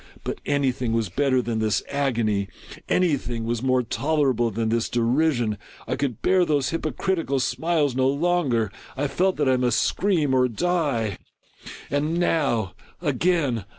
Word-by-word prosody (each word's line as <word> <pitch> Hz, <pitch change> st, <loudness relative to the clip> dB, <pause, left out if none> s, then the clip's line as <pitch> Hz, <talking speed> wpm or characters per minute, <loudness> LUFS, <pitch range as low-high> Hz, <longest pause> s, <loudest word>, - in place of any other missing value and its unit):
But -, -, -5 dB
any 140 Hz, -2 st, +2 dB
thing 125 Hz, -2 st, -3 dB
was 115 Hz, -4 st, 0 dB
better 130 Hz, +4 st, +1 dB
than 115 Hz, -1 st, -2 dB
this 110 Hz, -1 st, +1 dB
agony! 115 Hz, -8 st, 0 dB, 0.4 s
Any 175 Hz, -6 st, +3 dB
thing 120 Hz, -2 st, -5 dB
was 115 Hz, 0 st, -2 dB
more 130 Hz, -1 st, +2 dB
tolera 145 Hz, +3 st, +1 dB
ble 120 Hz, +1 st, +1 dB
than 110 Hz, +1 st, -2 dB
this 115 Hz, 0 st, 0 dB
derision! 120 Hz, -2 st, +1 dB, 0.3 s
I -, -, -1 dB
could 130 Hz, -6 st, -3 dB
bear 185 Hz, -1 st, +4 dB
those 145 Hz, -6 st, +1 dB
hypocritical 165 Hz, -1 st, -1 dB
smiles 145 Hz, +2 st, 0 dB
no 130 Hz, 0 st, +2 dB
longer! 140 Hz, -, +1 dB, 0.3 s
I 145 Hz, +2 st, 0 dB
felt 185 Hz, +7 st, +1 dB
that 145 Hz, -2 st, +1 dB
I 130 Hz, -1 st, +3 dB
must 125 Hz, -2 st, +2 dB
scream 170 Hz, -9 st, +1 dB
or 130 Hz, -1 st, +4 dB
die! 125 Hz, -, -1 dB, 0.3 s
— -, -, -14 dB
and 150 Hz, +4 st, 0 dB
now 140 Hz, -, +1 dB
— -, -, -29 dB
again 145 Hz, -, 0 dB
130 Hz, 165 wpm, -24 LUFS, 115-155 Hz, 0.4 s, bear